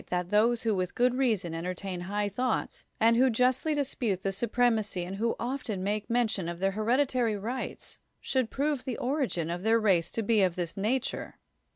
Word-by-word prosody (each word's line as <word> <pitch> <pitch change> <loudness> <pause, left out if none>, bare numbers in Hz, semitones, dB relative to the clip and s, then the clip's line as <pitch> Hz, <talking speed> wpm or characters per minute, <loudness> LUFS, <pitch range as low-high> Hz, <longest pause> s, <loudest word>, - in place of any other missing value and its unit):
Si; - - -22
THE - - 0
WORLD'S - - +3
FAMOUS 180 - -13
ORATIONS 215 +3 +5
those 240 -1 -2
who 220 -2 +1
with 185 -1 -2
good 245 0 +3
reason 220 -10 0
entertain 180 +2 -4
high 205 +3 -1
thoughts, 245 +4 -2
and 230 +1 +5
who 260 +2 +5
justly 255 +6 +2
dispute 235 -9 -1
the 195 - 0
supremacy 220 -3 +1
and 185 +2 -5
who 230 +2 0
often 240 -6 -3
make 205 +1 -2
mention 220 -7 0
of 170 0 -6
their 195 +1 +1
hereditary 235 +1 +1
rights, 235 +6 -5 0.2
should 260 -4 0
prove 285 0 -1
the 255 - -4
origin 245 - -1
of 175 +1 -3
their 225 +3 +3
race 190 -6 +2
to 225 - -3
be 215 0 +3
of 185 -3 +2
this 175 -2 -3
nature. 245 +7 -2
220 Hz, 205 wpm, -29 LUFS, 190-250 Hz, 0.2 s, ORATIONS